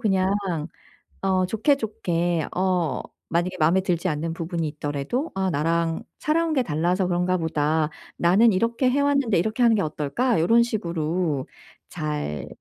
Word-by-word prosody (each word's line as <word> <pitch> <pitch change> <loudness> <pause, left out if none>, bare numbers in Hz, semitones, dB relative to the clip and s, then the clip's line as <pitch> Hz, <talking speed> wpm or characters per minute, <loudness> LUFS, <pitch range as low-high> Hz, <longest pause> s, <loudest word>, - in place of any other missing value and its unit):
그냥 190 -4 +2 0.9
어 190 -1 +2
좋게좋게 185 - 0
어 180 -6 0 0.3
만약에 180 +2 0
마음에 165 +5 +4
들지 180 -1 -1
않는 165 0 -2
부분이 165 -1 -3
있더라도 145 - -3
'아 190 -1 0
나랑 165 +1 0 0.2
살아온 325 +1 +1
게 265 -4 +2
달라서 175 +2 0
그런가 180 +1 +1
보다.' 155 -1 0 0.3
"나는 200 +6 +4
이렇게 230 +6 +1
해 280 +3 +1
왔는데 280 -8 +2
이렇게 220 +7 0
하는 230 -2 +5
게 205 - +1
어떨까?" 160 - 0
요런 225 +9 +4
식으로 170 - -2 0.4
잘 75 0 -4
180 Hz, 305 characters per minute, -24 LUFS, 160-220 Hz, 0.9 s, 하는